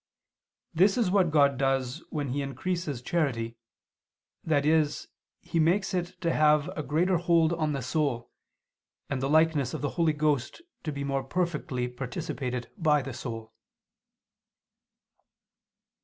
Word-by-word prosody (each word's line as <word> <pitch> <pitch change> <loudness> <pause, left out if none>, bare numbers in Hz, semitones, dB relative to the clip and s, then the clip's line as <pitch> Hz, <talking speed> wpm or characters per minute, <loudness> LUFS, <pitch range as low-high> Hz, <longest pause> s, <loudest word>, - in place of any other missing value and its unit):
This 195 +6 +4
is 220 -7 +2
what 190 -3 +3
God 140 -3 +3
does 135 +2 0
when 145 -4 -3
He 140 +3 -1
increases 145 -1 -3
charity, 120 -8 -1 0.9
that 145 -3 +1
is 155 -1 +2 0.3
He 165 - -2
makes 180 +6 +2
it 180 0 -3
to 170 -2 +1
have 150 +1 +4
a 155 - -2
greater 165 +6 +1
hold 170 -1 +3
on 155 -3 0
the 135 -2 -3
soul, 130 -3 -1 0.8
and 135 -2 -1
the 135 - 0
likeness 155 -4 +3
of - - -5
the 145 - +1
Holy 160 -2 +3
Ghost 150 - -1 0.2
to 155 - -1
be 140 -1 -4
more 135 -1 -1
perfectly 150 -5 -2
participated 125 0 -4
by 150 -4 +3
the 135 -1 -6
soul. 115 -2 -7
150 Hz, 140 wpm, -28 LUFS, 135-165 Hz, 0.9 s, This